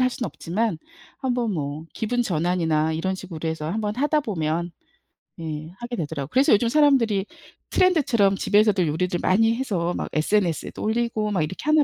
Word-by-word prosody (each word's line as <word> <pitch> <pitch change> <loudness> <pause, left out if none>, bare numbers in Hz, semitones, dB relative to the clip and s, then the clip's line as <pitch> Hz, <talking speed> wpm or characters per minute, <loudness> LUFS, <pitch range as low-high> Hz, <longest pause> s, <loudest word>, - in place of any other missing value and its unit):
할 255 0 +3
수는 245 -2 -3
없지만 195 +3 -2 0.4
한번 245 -4 -1
뭐 150 +1 -4
기분 245 +2 -1
전환이나 165 -5 +1
이런 180 +4 -1
식으로 170 -4 -6
해서 160 0 -3
한번 210 +1 -2
하다 295 +4 +2
보면 170 - -2 0.7
예 155 0 -5
하게 240 0 -5
되더라고요. 150 -6 -4
그래서 265 -2 +4
요즘 230 +3 +3
사람들이 245 -9 +3 0.5
트렌드처럼 260 - +3
집에서도 205 -3 +3
요리들 175 +3 -1
많이 225 +4 +3
해서 180 -9 -1
막 - - -3
SNS에도 170 +1 0
올리고 220 -1 0
막 185 -5 +1
이렇게 155 +5 -4
하나 305 0 +5
195 Hz, 385 characters per minute, -24 LUFS, 165-235 Hz, 0.7 s, 하나